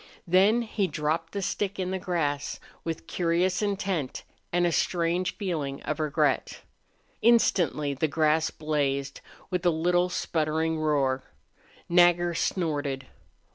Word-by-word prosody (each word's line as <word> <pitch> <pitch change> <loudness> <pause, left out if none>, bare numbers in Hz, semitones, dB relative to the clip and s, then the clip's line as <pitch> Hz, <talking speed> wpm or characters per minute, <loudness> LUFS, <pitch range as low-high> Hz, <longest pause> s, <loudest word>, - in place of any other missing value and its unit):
Then 195 +7 +4
he 215 -3 -1
dropped 160 +1 -2
the 200 -1 -3
stick 200 +2 -2
in 185 -1 -2
the 190 - -2
grass, 160 -6 -2 0.2
with 165 -1 -4
curious 180 +2 +1
intent 195 -8 -2 0.3
and 175 0 +2
a 170 - +2
strange 175 +2 0
feeling 155 -9 -3
of 155 - -3
regret. 150 -2 0 0.6
Instantly 180 -10 +3
the 140 +4 0
grass 155 +1 +2
blazed 140 -3 -2 0.3
with 180 -1 -1
a 175 - +4
little 175 +2 +2
sputtering 160 -1 -1
roar. 140 -4 +1 0.6
Nagger 175 0 +4
snorted. 145 -6 -1
165 Hz, 125 wpm, -27 LUFS, 150-180 Hz, 0.6 s, Then